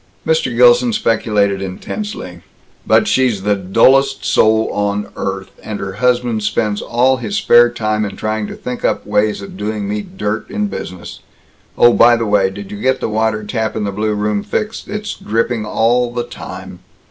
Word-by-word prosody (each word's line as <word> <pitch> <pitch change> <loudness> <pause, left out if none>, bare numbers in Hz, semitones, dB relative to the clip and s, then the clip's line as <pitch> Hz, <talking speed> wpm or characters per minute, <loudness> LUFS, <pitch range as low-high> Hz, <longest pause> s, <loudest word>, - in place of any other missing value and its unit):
Mr. 485 0 0
Gilson 485 - +5
speculated 105 - +1
intensely, 95 - -6 0.5
"But - - +4
she's 125 -7 +1
the 105 0 +2
dullest 130 +8 +3
soul 110 0 +3
on 105 0 -1
earth, 95 -1 -4
and 105 -2 -5
her 95 -1 -5
husband 125 -3 +1
spends 105 0 -1
all 130 +3 +2
his 115 -4 -4
spare 120 0 +5
time 110 -2 -1
in 100 - -4
trying 110 -1 -2
to - - -7
think 125 0 -6
up - - 0
ways 105 0 0
of 100 - -10
doing 105 0 -3
me 105 +1 -2
dirt 105 +2 -4
in 210 - -1
business. 90 - -7 0.6
Oh, 120 0 +6
by 120 0 +6
the 115 -1 -1
way, 100 -2 +2
did 100 +1 -9
you 105 - -7
get 130 +2 +1
the - - -2
water 110 0 0
tap 110 0 -2
in 110 - -2
the 100 - -2
blue 105 +1 -1
room 105 0 -1
fixed? 215 - -4
It's 210 +1 -4
dripping 115 0 -2
all 120 +3 +1
the 120 0 -2
time." - - -9
110 Hz, 180 wpm, -16 LUFS, 105-120 Hz, 0.6 s, Oh